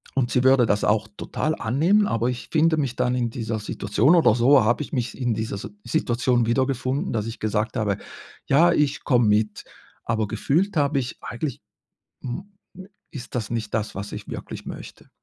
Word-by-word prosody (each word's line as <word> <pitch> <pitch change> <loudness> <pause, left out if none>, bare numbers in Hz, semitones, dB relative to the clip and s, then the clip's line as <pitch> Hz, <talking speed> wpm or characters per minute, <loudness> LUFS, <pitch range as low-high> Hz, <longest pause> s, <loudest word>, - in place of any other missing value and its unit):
und 125 -2 +1
sie 125 - +2
würde 130 -2 +5
das 105 -1 +1
auch 105 0 +1
total 155 +1 -2
annehmen, 165 - +2
aber 115 - 0
ich 125 -1 -4
finde 160 0 +3
mich 135 -5 -2
dann 125 - +1
in 120 -2 0
dieser 115 -1 -3
Situation 105 - +2
oder 120 -10 +5
so 125 +1 +5
habe 120 +6 +2
ich - - -8
mich 125 -5 -2
in 120 -4 0
dieser 110 -2 -3
Si - - -7 0.2
Situation 120 -5 +1
wiedergefunden, 130 +2 0
dass 110 -2 -1
ich 115 - -6
gesagt 110 +3 -1
habe: 105 -3 0 0.5
„Ja, 170 +5 +5
ich 145 -4 0
komme 120 -4 +3
mit“, 105 0 +1 0.4
aber 110 -2 0
gefühlt 170 - 0
habe 145 -1 +2
ich: 125 -2 -4
„Eigentlich, 130 +2 -5 0.6
hm, 185 +12 -6 0.6
ist 125 -3 -9
das 115 -4 -3
nicht 110 -3 -3
das, 110 -1 -2
was 100 +2 -6
ich - - -7
wirklich - - -7
möchte.“ - - -9
120 Hz, 185 wpm, -24 LUFS, 110-140 Hz, 0.6 s, würde